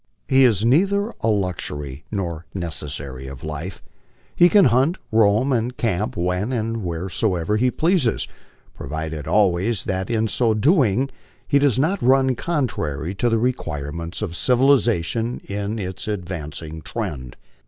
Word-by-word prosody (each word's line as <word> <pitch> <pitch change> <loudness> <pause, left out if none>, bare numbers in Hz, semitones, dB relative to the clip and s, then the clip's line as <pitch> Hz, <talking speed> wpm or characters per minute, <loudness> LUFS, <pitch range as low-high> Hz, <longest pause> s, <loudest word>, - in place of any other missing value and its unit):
He 135 0 +5
is 110 -3 +2
neither 200 - +2
a - - 0
luxury 75 -9 -2
nor 85 -6 -4
necessary 70 -6 -4
of 65 -1 -9
life. 80 +4 -6 0.6
Ilo 175 - +8
can 200 -2 +6
hunt, 130 +9 +3
roam, 110 +5 +3
and 125 +1 -1
camp 105 -2 -1
when 90 +6 -1
and 115 -2 -2
wheresoever 90 +2 -1
he 125 +3 +3
pleases, 160 -3 +1 0.5
provided 80 -1 -5
always 100 +1 +2
that 95 +1 -2
in 115 -1 +1
so 110 +1 +1
doing 135 - +3 0.4
he 140 - +4
does 140 -5 +3
not 170 +8 +1
run 130 +1 +4
contrary 95 - -2
to 120 +5 0
the 115 - +2
requirements 85 - -3
of 85 - -4
civilization 120 -3 +2
in 100 +2 -3
its 95 -2 -5
advancing 80 -5 -5
tread. 75 - -5
105 Hz, 135 wpm, -22 LUFS, 85-125 Hz, 0.6 s, Ilo